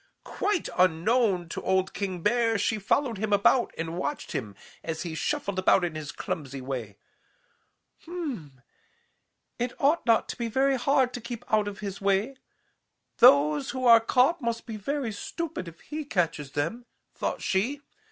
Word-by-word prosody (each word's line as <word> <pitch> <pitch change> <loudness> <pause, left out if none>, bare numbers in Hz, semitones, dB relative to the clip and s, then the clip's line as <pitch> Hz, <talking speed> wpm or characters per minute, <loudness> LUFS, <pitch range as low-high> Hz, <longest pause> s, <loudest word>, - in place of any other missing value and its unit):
"Quite 410 -3 -1
unknown 185 +2 +3
to - - -5
old 190 0 +1
King 185 -4 -4
Bear, 230 0 +2
she 215 +2 0
followed 230 +2 0
him 215 0 -2
about 205 +5 +4
and 165 +1 -4
watched 295 - -3
him 105 -5 -4 0.3
as 160 -1 -4
he 170 -3 -5
shuffled 200 - -2
about 185 0 +4
in 175 -2 -1
his 155 -2 -6
clumsy 140 -3 -5
way. 125 -6 -5 1.1
'Hm - - -14 0.2
m, 145 - -10 1.0
it 245 +1 -3
ought 300 +5 +3
not 230 -1 +4
to - - -5
be 235 - -2
very 270 +4 +2
hard 265 -1 +2
to 245 - -5
keep 235 0 -7
out 210 -1 +3
of 205 0 -6
his 200 -1 -5
way. 200 +7 +1 0.8
Those 150 - +5
who 260 -1 -3
are 230 -1 +9
caught 260 +8 +3
must 235 -1 -2
be 225 - -6
very 255 +3 -2
stupid 315 - -5
if 170 0 -11
he 310 +1 -5
catches 165 - -1
them,' 170 +12 -3 0.3
thought - - -3
she. 235 +9 0
210 Hz, 165 wpm, -27 LUFS, 170-250 Hz, 1.1 s, are